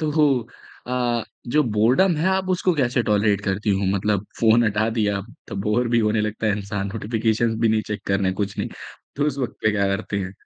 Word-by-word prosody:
तो 150 -3 +3 0.5
अ, 120 -2 0 0.3
जो 150 +4 +4
बोरडम 125 - +3
है 160 +5 0
आप 190 0 0
उसको 180 0 +2
कैसे 125 -3 +1
टॉलरेट 105 -2 +2
करती 100 +1 -1
हूँ? 100 0 +1
मतलब 100 0 0 0.2
फ़ोन 115 +1 +5
हटा 105 +1 +1
दिया 105 -3 0 0.3
तो 95 - -6
बोर 115 +3 +1
भी 120 0 +2
होने 105 -1 +2
लगता 110 +1 -2
है 105 - +3
इंसान, 100 -1 -3
नोटिफिकेशंस 115 +1 0
भी 115 - +3
नहीं 110 0 +2
चेक 105 -1 -4
करना 95 -1 +1
कुछ 100 - -5
नहीं। - - -1 0.5
तो 145 +1 +1
उस 140 -2 -2
वक़्त 125 -3 -3
पे 110 - +4
क्या 100 -1 +1
करती 100 +1 -4
हैं? 95 0 -6
110 Hz, 205 wpm, -22 LUFS, 105-125 Hz, 0.5 s, फ़ोन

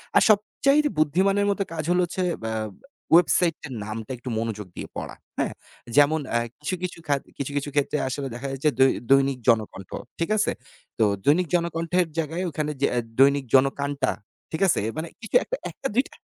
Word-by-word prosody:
আর - - +7
সবচাইতে 275 +8 +3
বুদ্ধিমানের 195 +7 +3
মতো 200 0 0
কাজ 155 - -3
হলো 180 0 +3
হচ্ছে 185 +2 -3 0.2
অ্যা 110 0 -2 0.6
ওয়েবসাইটটার 165 -4 +3
নামটা 110 +2 -6
একটু 125 +1 -7
মনোযোগ 110 -3 -3
দিয়ে - - -6
পড়া। - - -5 0.2
হ্যাঁ? - - 0 0.4
যেমন 145 +2 +5
অ্যা 120 0 +2 0.2
কিছু, 150 +5 -2
কিছু 180 - -3
খাত 140 -1 +1 0.2
কিছু, 140 0 -3
কিছু 145 +1 -2
ক্ষেত্রে 145 +1 +1
আসলে 135 +1 -3
দেখা 135 +3 -5
যাচ্ছে 135 +3 +1
দৈ 130 0 +6 0.2
দৈনিক 135 -1 +4
জনকণ্ঠ। 110 -4 +1 0.3
ঠিক 165 - 0
আছে? 215 - +2 0.5
তো - - +5 0.2
দৈনিক 165 +5 +4
জনকণ্ঠের 170 +1 +1
জায়গায় 165 +4 -2
ওখানে 150 0 -2
যেয়ে - - +3
আ - - +4 0.2
দৈনিক 140 0 +5
জনকাণটা, 140 0 +2 0.4
ঠিক 160 - -3
আছে? - - +3
অ্যা 110 - -2
মানে 160 +2 -3
কিছু 225 - -5
একটা, - - -3
১ - - -13
টা 270 - +2
২ 255 - +4
টা - - -19
150 Hz, 185 wpm, -25 LUFS, 135-175 Hz, 0.6 s, আর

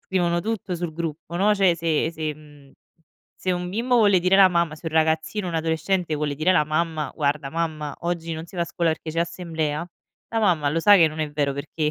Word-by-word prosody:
scrivono 175 -2 0
tutto 210 -4 -3
sul 170 -2 -4
gruppo, 165 0 -5
no; 210 +3 +3
cioè 190 -4 +3
se 165 -1 0
se, 155 -2 -3
mhmm, 145 -2 -17 0.6
se 185 - -2
un 180 0 -3
bimbo 240 +5 +1
vuole 205 -5 +5
dire 185 +2 +3
alla 195 -1 +8
mamma 170 -3 0
se 165 - -12
un 160 - -14
ragazzino, 160 +5 +1
un 165 - -5
adolescente 160 +1 0
vuole 150 -1 -2
dire 160 +6 +2
la 150 -4 +3
mamma: 155 -2 -1
"Guarda 145 -1 -1
mamma, 155 -2 -3
oggi 170 -1 -3
non 160 - -6
si 175 +2 -13
va 170 - +1
a - - 0
scuola 170 0 0
perché 160 0 -4
c'è 165 - -1
assemblea", 170 -2 -3 0.4
la 230 - -1
mamma 165 -8 +2
lo 165 +3 0
sa 205 +3 +7
che 165 -3 +6
non 155 +1 -6
è 150 -1 -2
vero 145 -2 0
perché 150 +2 -2
165 Hz, 225 wpm, -23 LUFS, 155-180 Hz, 0.6 s, alla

